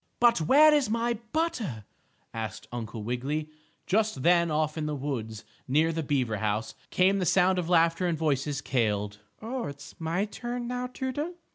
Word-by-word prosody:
"But 235 -6 +5
where 300 - +6
is 290 -6 +2
my 235 0 0
butter?" 230 - -2 0.5
asked 110 -3 -5
Uncle 115 -2 -5
Wiggily. 140 +7 -2 0.3
Just 210 -8 +1
then, 170 -1 +4
off 155 0 0
in 155 -2 -2
the 150 - -2
woods, 120 -6 -4 0.2
near 155 +5 +3
the 165 - -1
beaver 130 -7 0
house, 110 +1 -1 0.2
came 190 +2 +3
the - - 0
sound 185 +2 +4
of 175 -1 -3
laughter 170 +1 +3
and 170 -2 0
voices 145 -2 0
cailed: 105 -4 -1 0.2
"Oh, 245 +2 -3
it's 140 0 -9
my 170 +5 0
turn 240 +3 -5
now, 250 0 -2
Toodle." 270 +7 -4
160 Hz, 165 wpm, -28 LUFS, -, 0.5 s, where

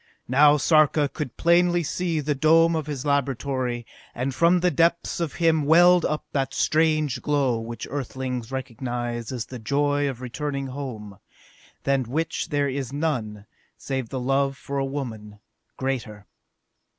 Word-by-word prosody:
Now 145 +3 +5
Sarka 155 0 +3
could 140 -2 -6
plainly 175 +1 +3
see 165 0 -1
the 150 +1 0
dome 165 +3 +4
of 155 -2 -3
his 145 -2 -4
laboratory, 130 -3 -1 0.3
and 130 +2 -2
from 170 +6 +4
the 180 0 +3
depths 170 +4 +1
of 165 -5 -2
him 160 -2 +2
welled 175 +3 +6
up 150 - -2
that 135 -1 -1
strange 155 -3 +1
glow 135 -5 +1
which 115 0 -6
Earthlings 130 -3 -4
recognize 120 -2 -4
as 125 -3 -4
the 125 - -9
joy 145 +4 +1
of 130 -3 -6
returning 140 +2 -4
home, 120 -7 -7 0.6
than 135 -2 +1
which 160 +7 -2
there 145 -1 +1
is 135 -1 -3
none, 120 -9 -2 0.3
save 130 -4 -4
the 130 - -3
love 135 +1 0
for 140 0 -4
a 135 - 0
woman, 115 -7 -6 0.4
greater. 115 -6 -4
140 Hz, 150 wpm, -24 LUFS, 125-155 Hz, 0.6 s, welled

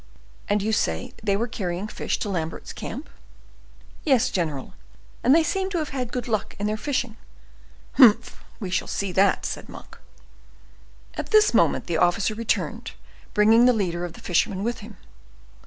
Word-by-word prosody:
"And 205 -1 +1
you 220 +1 0
say 80 - -1
they 200 -2 +1
were 230 +3 -1
carrying 185 -3 -3
fish - - -3
to 210 - -2
Lambert's 165 -4 -4
camp?" - - -7 1.0
"Yes, 265 -6 +3
general, 155 -8 -3 0.5
and 260 +5 +6
they 330 - +5
seem 380 +3 -1
to 375 - -2
have 310 -2 -2
had 250 -3 -4
good 250 -1 -3
luck 215 -3 -2
in 205 - -3
their 210 +1 0
fishing." 245 -2 -2 0.8
"Humph! 235 -3 +5 0.2
We 190 -5 -5
shall 190 - 0
see 200 -2 -2
that," 195 +2 +2
said - - -5
Monk. - - -12 1.1
At - - -5
this 430 -1 +5
moment - - +3
the 170 - -1
officer 180 +5 +2
returned, 230 +1 -2 0.4
bringing 220 +3 +6
the 250 - +5
leader 175 -6 -1
of 175 -2 -5
the - - -13
fishermen 185 +2 0
with 235 +1 -2
him. 210 -2 -11
215 Hz, 170 wpm, -24 LUFS, 185-240 Hz, 1.1 s, and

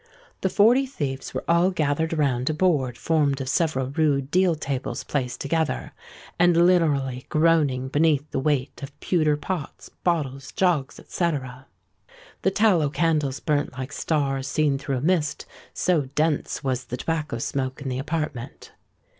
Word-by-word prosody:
The 190 - +1
Forty 240 +8 +4
Thieves 140 - -4
were - - -2
all 170 +2 +4
gathered 160 -2 0
round 135 -4 +1
a 155 - -1
board 150 -8 +1
formed 145 -4 +1
of 135 - -4
several 135 -3 0
rude 140 -2 +1
deal 180 -1 +3
tables 140 -3 -4
placed 130 -4 -3
together, 155 - -1 0.5
and 175 -1 +5
literally 140 -8 +1
groaning 155 -5 +2
beneath 145 +1 +2
the - - -1
weight 140 -1 -1
of 140 0 -9
pewter 155 -4 +1
pots, 160 -1 -5
bottles, 135 -6 -1
jugs, 170 -8 0
&c. 170 -1 0 1.1
The - - +3
tallow 190 -8 +3
candles 150 -3 0
burnt 145 -4 0
like 130 +1 -6
stars 135 -4 -1
seen 145 -1 +1
through 140 -1 -2
a - - -3
mist, 155 -1 0 0.3
so 165 -6 +1
dense 155 -1 0
was 130 -2 -1
the 125 +1 -5
tobacco 155 -6 -2
smoke 130 +2 -3
in 140 - -6
the 130 0 -2
apartment. 145 -4 -4
150 Hz, 150 wpm, -24 LUFS, 135-165 Hz, 1.1 s, and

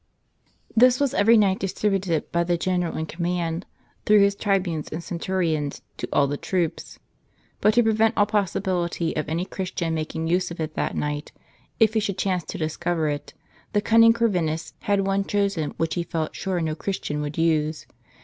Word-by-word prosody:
This 250 +2 +6
was 280 -3 +1
every 225 +3 +5
night 195 -3 +3
distributed 195 -4 -1
by 170 0 +2
the 175 0 0
general 180 -1 -1
in 160 - -2
command, 170 +1 -2 0.4
through 210 -1 +6
his 200 0 +4
tribunes 185 -7 -1
and 160 +2 -5
centurions, 170 -5 -2
to - - -4
all 140 - +4
the 145 +1 -2
troops. 175 -1 -2 0.6
But 215 +1 +3
to 240 - +5
prevent 220 0 +2
all 205 - +5
possibility 180 -5 -1
of 155 -1 -2
any 170 +3 -1
Christian 180 -4 -3
making 160 0 -3
use 180 +3 +1
of 170 - -8
it 155 -1 -3
that - - -2
night, 150 0 -3 0.5
if 220 -2 +5
he 220 - +3
should 200 -3 -2
chance 185 -2 0
to - - -6
discover 160 0 -1
it, 145 0 -5 0.4
the 205 - +3
cunning 230 +1 +6
Corvinus 180 -9 0
had 200 -1 +1
one 195 0 +1
chosen 200 -7 -1
which 165 -1 0
he 175 - -1
felt 165 -2 -3
sure 190 -2 -2
no 160 -1 -1
Christian 155 -4 -3
would 145 0 -5
use. 155 -1 +1
175 Hz, 180 wpm, -24 LUFS, 160-200 Hz, 0.6 s, This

